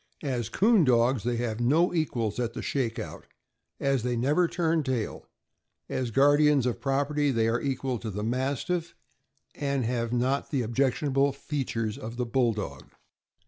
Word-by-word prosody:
As 125 Hz, -6 st, -2 dB
'coon 215 Hz, -2 st, +4 dB
dogs, 120 Hz, -2 st, +3 dB
they 120 Hz, +2 st, -1 dB
have 115 Hz, -2 st, -2 dB
no 155 Hz, +10 st, +3 dB
equals 120 Hz, -, -1 dB
at 120 Hz, -2 st, -1 dB
the -, -, -6 dB
shake 120 Hz, -4 st, -1 dB
out, 110 Hz, -, -7 dB, 0.5 s
as 135 Hz, -2 st, +1 dB
they 125 Hz, +1 st, -1 dB
never 145 Hz, +9 st, +2 dB
turn 165 Hz, -2 st, +1 dB
taiL 130 Hz, -6 st, -3 dB, 0.6 s
As 130 Hz, -2 st, -2 dB
guardians 145 Hz, +2 st, +4 dB
of 125 Hz, -, -2 dB
property 145 Hz, +1 st, +1 dB
they 115 Hz, -4 st, +2 dB
are 115 Hz, +1 st, +1 dB
equal 130 Hz, -2 st, -2 dB
to 110 Hz, -, -5 dB
the 105 Hz, +1 st, -4 dB
Mastiff, 135 Hz, +8 st, -2 dB, 0.6 s
and 140 Hz, -4 st, -1 dB
have 115 Hz, -1 st, -1 dB
not 130 Hz, +3 st, 0 dB
the 135 Hz, -4 st, 0 dB
objectionable 135 Hz, +3 st, +1 dB
features 125 Hz, -7 st, -3 dB
of 115 Hz, +2 st, -7 dB
the 125 Hz, -, -1 dB
Bulldog. 115 Hz, -, -1 dB
130 Hz, 155 wpm, -27 LUFS, 115-140 Hz, 0.6 s, coon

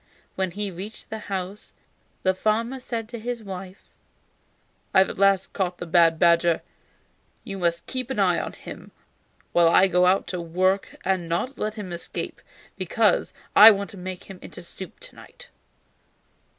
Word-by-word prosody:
When 190 Hz, -1 st, -1 dB
he 200 Hz, +2 st, -3 dB
reached 200 Hz, +6 st, -9 dB
the 220 Hz, -, -4 dB
house 195 Hz, +1 st, -5 dB, 0.5 s
the 185 Hz, -, +3 dB
farmer 225 Hz, +6 st, 0 dB
said 230 Hz, -3 st, -4 dB
to 235 Hz, -1 st, -6 dB
his 235 Hz, 0 st, -4 dB
wife: 190 Hz, -1 st, -8 dB, 1.1 s
"I -, -, +6 dB
have 190 Hz, -, +5 dB
at -, -, -10 dB
last 195 Hz, -1 st, +3 dB
caught 180 Hz, -3 st, -1 dB
the -, -, -6 dB
bad 165 Hz, -1 st, +4 dB
badger. 170 Hz, 0 st, +3 dB, 0.8 s
You 195 Hz, -1 st, -6 dB
must 170 Hz, -1 st, 0 dB
keep 255 Hz, -1 st, -4 dB
an 265 Hz, -, -3 dB
eye 185 Hz, -4 st, +3 dB
on -, -, -5 dB
him -, -, -10 dB, 0.6 s
while 170 Hz, -1 st, +5 dB
I 175 Hz, -, +6 dB
am 190 Hz, -2 st, +2 dB
out 180 Hz, +2 st, +3 dB
at 180 Hz, -, -2 dB
work 185 Hz, +4 st, 0 dB
and 185 Hz, -3 st, 0 dB
not 245 Hz, +11 st, -2 dB
let 215 Hz, 0 st, -2 dB
him 195 Hz, -5 st, -6 dB
escape, 170 Hz, -, -5 dB, 0.4 s
because -, -, +1 dB, 0.2 s
I 215 Hz, +2 st, +12 dB
want 200 Hz, -1 st, 0 dB
to 200 Hz, -, -11 dB
make 185 Hz, 0 st, -6 dB
him 190 Hz, -2 st, -11 dB
into -, -, -10 dB
soup 185 Hz, +2 st, -10 dB
to -, -, -11 dB
night." -, -, -14 dB
190 Hz, 170 wpm, -25 LUFS, 180-215 Hz, 1.1 s, I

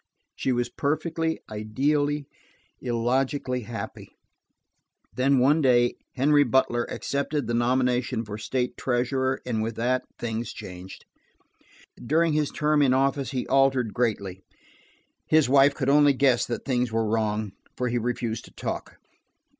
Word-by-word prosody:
She 130 Hz, -, -1 dB
was 120 Hz, -1 st, 0 dB
perfectly, 160 Hz, +5 st, -2 dB
ideally, 145 Hz, +7 st, -1 dB, 0.6 s
illogically 125 Hz, +2 st, -1 dB
happy. 115 Hz, 0 st, -7 dB, 1.0 s
Then 135 Hz, +2 st, +2 dB
one 145 Hz, +5 st, +4 dB
day 120 Hz, -3 st, +4 dB, 0.2 s
Henry 145 Hz, +2 st, +4 dB
Butler 120 Hz, -2 st, +1 dB
accepted 140 Hz, 0 st, -2 dB
the 120 Hz, -, -2 dB
nomination 125 Hz, -1 st, +1 dB
for 105 Hz, 0 st, -7 dB
state 125 Hz, +3 st, -2 dB
treasurer, 130 Hz, +1 st, -1 dB
and 115 Hz, -3 st, -1 dB
with 110 Hz, 0 st, -3 dB
that 125 Hz, +2 st, 0 dB, 0.2 s
things 115 Hz, -1 st, -4 dB
changed. 90 Hz, +1 st, -10 dB, 1.0 s
During 160 Hz, +5 st, +2 dB
his 150 Hz, -1 st, +1 dB
term 150 Hz, 0 st, +1 dB
in 130 Hz, -2 st, +4 dB
office 135 Hz, 0 st, +1 dB
he 130 Hz, -2 st, -3 dB
altered 135 Hz, -4 st, +2 dB
greatly; 100 Hz, -6 st, -2 dB, 0.8 s
his 155 Hz, -3 st, +4 dB
wife 140 Hz, +1 st, +5 dB
could 130 Hz, -, -2 dB
only 145 Hz, 0 st, +5 dB
guess 130 Hz, -2 st, +2 dB
that 120 Hz, -, -4 dB
things 125 Hz, -3 st, 0 dB
were 115 Hz, 0 st, 0 dB
wrong, 110 Hz, -1 st, -1 dB, 0.3 s
for 125 Hz, -, -1 dB
he 120 Hz, 0 st, 0 dB
refused 115 Hz, -1 st, -3 dB
to -, -, -16 dB
talk. -, -, -5 dB
125 Hz, 135 wpm, -26 LUFS, 120-140 Hz, 1.0 s, wife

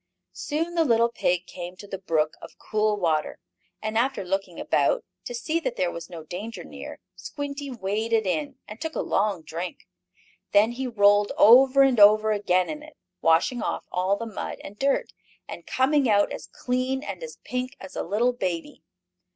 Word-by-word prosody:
Soon 325 Hz, +4 st, -3 dB
the 335 Hz, -1 st, +3 dB
little 235 Hz, -4 st, +3 dB
pig 180 Hz, -5 st, 0 dB
came 180 Hz, 0 st, -8 dB
to 200 Hz, -, -11 dB
the 195 Hz, -1 st, -6 dB
brook 155 Hz, -4 st, 0 dB
of -, -, -12 dB
cool 215 Hz, -1 st, 0 dB
water, 160 Hz, -5 st, 0 dB, 0.5 s
and 215 Hz, +1 st, 0 dB
after 260 Hz, -3 st, 0 dB
looking 190 Hz, -1 st, -3 dB
about, -, -, +1 dB, 0.2 s
to 245 Hz, -, -5 dB
see 310 Hz, +8 st, -1 dB
that 255 Hz, -7 st, -3 dB
there 180 Hz, -2 st, 0 dB
was 170 Hz, -1 st, -8 dB
no 170 Hz, -3 st, -8 dB
danger 205 Hz, +8 st, -7 dB
near, -, -, -9 dB, 0.2 s
Squinty 285 Hz, -1 st, -6 dB
waded 220 Hz, 0 st, -1 dB
in, 155 Hz, -6 st, -2 dB
and 210 Hz, +2 st, -10 dB
took 320 Hz, 0 st, -4 dB
a -, -, 0 dB
long 200 Hz, -4 st, 0 dB
drink. 170 Hz, +3 st, -6 dB, 0.7 s
Then 210 Hz, +3 st, +5 dB
he 260 Hz, +2 st, -4 dB
rolled 205 Hz, -2 st, +4 dB
over 260 Hz, +4 st, +7 dB
and 260 Hz, -4 st, +3 dB
over 215 Hz, +1 st, +7 dB
again 185 Hz, -3 st, +2 dB
in 300 Hz, -1 st, -5 dB
it, 305 Hz, 0 st, -14 dB, 0.2 s
washing 165 Hz, +9 st, +3 dB
off -, -, -3 dB
all 185 Hz, +2 st, +1 dB
the 230 Hz, -, -5 dB
mud 220 Hz, -3 st, -5 dB
and 200 Hz, -, -9 dB
dirt, 275 Hz, 0 st, 0 dB, 0.3 s
and -, -, -9 dB
coming 270 Hz, 0 st, +2 dB
out 205 Hz, -1 st, +3 dB
as -, -, -7 dB
clean 255 Hz, +2 st, -2 dB
and -, -, -6 dB
as 485 Hz, -1 st, -8 dB
pink 255 Hz, 0 st, -4 dB
as 190 Hz, -, -10 dB
a -, -, -1 dB
little 230 Hz, +7 st, +1 dB
baby. 185 Hz, -, -4 dB
215 Hz, 185 wpm, -25 LUFS, 185-255 Hz, 0.7 s, over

